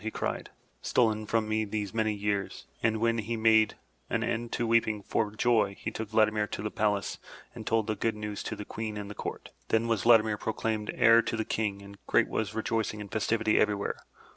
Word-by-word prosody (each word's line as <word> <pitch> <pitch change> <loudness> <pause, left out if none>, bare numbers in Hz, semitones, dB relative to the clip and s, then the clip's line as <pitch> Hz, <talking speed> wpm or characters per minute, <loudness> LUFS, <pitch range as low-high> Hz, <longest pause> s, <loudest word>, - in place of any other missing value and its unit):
'' - - -16
he 110 - -1
cried, - - -3 0.3
''stolen 110 -3 +1
from 110 -1 +1
me 110 0 +1
these 105 -1 -3
many 110 -1 +1
years!" 100 -1 -2 0.2
And 110 -1 +2
when 115 0 +2
he 110 +2 -3
had 115 - -2
made 110 -1 +5 0.3
an - - 0
end 115 0 -2
to 120 - 0
weeping 115 -2 +2
for 110 +1 0
joy, 105 -2 +2
he 110 - -4
took 110 -1 -5
Vladimir 110 -1 +2
to - - -5
the 105 - -2
palace 105 -2 0 0.3
and 115 -2 -9
told 110 -1 +2
the 110 - -1
good 110 +1 -1
news 105 -1 -5
to - - -3
the 105 - -7
Queen 110 0 -5
and 105 0 -6
the - - -5
Court. - - -6 0.2
Then 110 +1 +1
was 115 -4 +1
Vladimir 110 -2 +5
proclaimed 110 -1 -2
heir 115 0 +6
to 115 - -3
the 110 - -1
King 100 -2 -2
and 100 0 -12
great - - +3
was 110 - -1
the - - -7
rejoicing 110 -1 -1
and 100 -1 -8
festivity 110 0 +1
everywhere. 105 -1 0
110 Hz, 220 wpm, -29 LUFS, 105-115 Hz, 0.3 s, heir